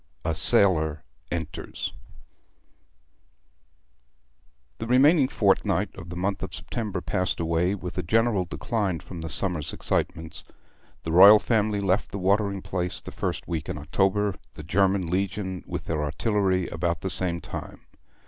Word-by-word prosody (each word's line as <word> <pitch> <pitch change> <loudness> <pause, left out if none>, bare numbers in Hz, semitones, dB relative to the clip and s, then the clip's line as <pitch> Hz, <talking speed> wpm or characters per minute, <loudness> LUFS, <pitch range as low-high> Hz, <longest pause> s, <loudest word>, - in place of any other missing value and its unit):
XXXV. 80 - +1
A - - 0
SAILOR 80 -3 +3 0.3
ENTERS 80 -3 -4 2.9
The 115 - -4
remaining 135 +4 +5
fortnight - - +1
of 85 - -10
the 85 - -6
month 95 +2 -2
of - - -5
September 105 -6 -4
passed 90 +1 -1
away, 85 +3 +1
with 90 -1 -6
a - - +2
general 110 +1 +2
decline 100 -2 -2
from 85 -3 -9
the 80 - -5
summer's 85 -3 -1
excitements. 80 0 -3 0.6
The 80 - -3
royal 100 +5 +9
family 105 -2 +1
left 95 0 +1
the - - -5
watering 100 0 +1
place 90 -1 -2
the - - -9
first - - -3
week 80 -3 -3
in - - -3
October, 95 +7 +1 0.2
the 80 - -8
German 95 +3 +2
Legion 95 +1 -2
with - - -5
their 75 -2 -1
artillery 95 +3 0
about 85 -1 -2
the 95 - -1
same 85 -2 0
time. - - -8
95 Hz, 145 wpm, -26 LUFS, 85-100 Hz, 2.9 s, royal